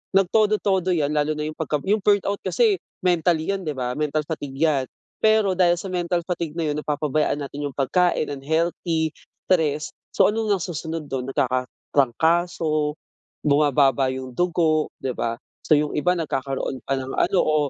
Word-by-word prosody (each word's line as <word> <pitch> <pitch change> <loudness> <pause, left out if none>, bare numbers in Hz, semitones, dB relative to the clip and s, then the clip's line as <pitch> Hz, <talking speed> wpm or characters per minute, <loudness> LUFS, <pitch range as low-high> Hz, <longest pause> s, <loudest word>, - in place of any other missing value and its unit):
nagtodo-todo 195 -1 +2
yan, 150 -3 0
lalo 150 0 +1
na 150 - -3
yung 155 - -6
pagka 150 -2 -1
yung 210 +3 +2
burnout 200 0 +2
kasi 440 -6 +2 0.2
mentally 175 -1 +2
yon, 195 -2 -3
'di 150 - -2
ba? 125 -1 -2
Mental 150 0 0
fatigue 145 -3 -6
yan. 145 -5 +2 0.3
Pero 215 -2 +4
dahil 175 -2 +4
sa 180 +3 -6
mental 175 -1 0
fatigue 170 -3 -3
na 165 -2 -1
yun 145 - -3
napapabayaan 150 0 0
natin 145 +1 -5
yung 135 - -9
pagkain 155 +4 +1
unhealthy, 160 +3 -1 0.4
stress. 155 -4 +1 0.2
So, - - +5
ano 225 +1 -1
nga 205 - +3
nasusunod 160 -3 -5
dun? 130 -1 -2
Nagkakatrangkaso, 150 +5 0 0.5
bumababa 140 -2 +3
yung 130 0 -6
dugo, 165 -2 +1
'di 130 - -1
ba? 115 0 -1 0.3
So, - - +5
yung 150 0 +1
iba 180 +4 +2
nagkakaroon 135 -5 -3
pa 135 - +1
ng 130 0 -5
ano 190 - +2
o 155 - +1
155 Hz, 165 wpm, -23 LUFS, 145-180 Hz, 0.5 s, So